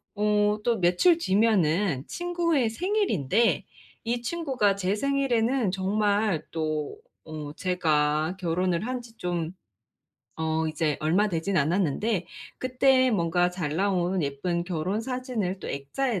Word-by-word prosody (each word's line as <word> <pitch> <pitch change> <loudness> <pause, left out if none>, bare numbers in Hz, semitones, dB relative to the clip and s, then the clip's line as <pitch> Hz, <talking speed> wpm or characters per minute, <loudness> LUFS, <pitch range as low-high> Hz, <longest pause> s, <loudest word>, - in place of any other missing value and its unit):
어 210 0 +2
또 230 -3 +1
며칠 180 - +4
뒤면은 190 - +2
친구의 340 -8 0
생일인데 235 - +1 0.4
이 235 +1 -1
친구가 260 -9 0
제 195 +1 0
생일에는 260 -3 +1
정말 200 -2 +1
또 155 - -2 0.3
어 155 -2 -7
제가 155 -2 +1
결혼을 180 +3 0
한지 245 -3 -5
좀 175 -2 -2 0.9
어 160 0 0
이제 155 -1 -1
얼마 185 +7 +2
되지는 180 +1 0
않았는데 180 +5 0 0.3
그때 255 0 +3
뭔가 175 -3 +2
잘 170 -5 -3
나온 185 -1 +1
예쁜 170 +5 -2
결혼 180 +4 -2
사진을 250 -6 -3
또 - - -7
액자에 185 - -2
190 Hz, 240 characters per minute, -26 LUFS, 165-235 Hz, 0.9 s, 며칠